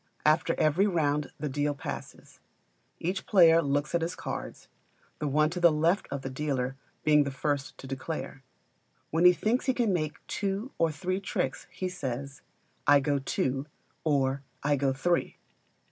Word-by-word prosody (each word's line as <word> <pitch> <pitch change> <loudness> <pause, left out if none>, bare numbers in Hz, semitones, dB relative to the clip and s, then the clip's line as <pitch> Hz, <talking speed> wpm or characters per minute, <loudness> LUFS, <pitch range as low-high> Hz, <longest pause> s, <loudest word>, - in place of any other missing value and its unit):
After 155 +1 +3
every 160 +7 +3
round 150 -6 0
the 150 - -2
deal 145 +1 -1
passes. 145 +1 -8 0.6
Each 185 +3 -3
player 165 -5 +7
looks 145 +1 -1
at 170 - +2
his 165 +2 -2
cards, - - -6 0.5
the 150 - -1
one 150 +2 +2
to 180 - -3
the 170 -1 +6
left 165 +6 +1
of 140 -1 -4
the 135 - -3
dealer 135 -2 -2 0.3
being 150 -1 +5
the 140 - -2
first 140 0 -2
to - - -10
declare. 135 +1 -5 0.7
When 165 +2 +2
he 180 - +9
thinks 230 +8 0
he 260 - +2
can 230 -6 +2
make 155 -3 -3
two 205 +6 -2
or 165 -1 +3
three 185 +6 -2
tricks 200 - -3
he 185 - -4
says, 135 -5 -5 0.5
"I 145 0 +7
go 140 0 0
two," 135 +1 -1 0.4
or 140 -3 +1 0.2
"I 145 0 +3
go 135 -1 +1
three." 170 +6 0
150 Hz, 165 wpm, -29 LUFS, 140-175 Hz, 0.7 s, he